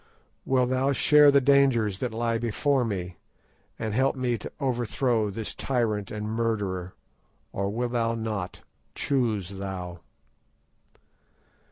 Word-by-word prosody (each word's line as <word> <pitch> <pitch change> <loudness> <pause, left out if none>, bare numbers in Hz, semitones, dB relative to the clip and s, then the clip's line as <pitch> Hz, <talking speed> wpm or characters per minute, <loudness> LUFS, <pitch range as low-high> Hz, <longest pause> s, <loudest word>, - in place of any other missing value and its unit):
Wilt 130 -1 +2
thou 135 +2 +2
share 150 +1 +6
the 140 0 +6
dangers 125 -8 +3
that 125 - -2
lie 115 0 -1
before 125 +4 +1
me, 90 -6 -4 0.6
and 110 -2 -3
help 135 +4 +2
me 125 -2 0
to - - -7
overthrow 120 -3 0
this 105 +2 -4
tyrant 110 -6 -1
and 105 0 -4
murderer, 105 -5 -2 0.6
or 100 0 -1
wilt 120 +3 -2
thou 115 -1 0
not? 110 -5 -4 0.3
Choose 110 -9 0
thou." 95 -3 -6
115 Hz, 125 wpm, -26 LUFS, 105-130 Hz, 0.6 s, share